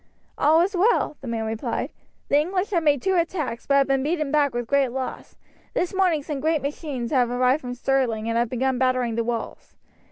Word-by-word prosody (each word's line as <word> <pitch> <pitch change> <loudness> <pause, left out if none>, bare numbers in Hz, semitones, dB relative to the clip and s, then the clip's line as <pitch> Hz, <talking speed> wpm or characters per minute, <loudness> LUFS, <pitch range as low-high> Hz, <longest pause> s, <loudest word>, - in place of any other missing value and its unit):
"All 315 +3 +4
is 385 +3 0
well," 360 -5 +2
the 270 - -8
man 225 -1 -2
replied. 220 0 -3 0.4
"The 285 - +4
English 365 +6 -1
have 345 -4 +2
made 290 -4 +2
two 380 -1 +2
attacks, 315 -8 -2
but 280 - +3
have 275 0 +5
been 270 -1 +1
beaten 305 0 -1
back 295 -2 +3
with 240 -1 -4
loss. 265 -2 -1 0.4
This 360 - 0
morning 360 -6 +2
some 290 -1 -4
great 315 -1 0
machines 280 -4 -4
have 250 -4 +3
arrived 250 +4 +2
from 245 -1 -5
Stirling 245 -4 0
and 230 - -1
have 235 0 +1
begun 260 +1 0
battering 255 -2 +1
the 230 +1 0
walls. 230 -1 -5
275 Hz, 200 wpm, -24 LUFS, 245-310 Hz, 0.4 s, have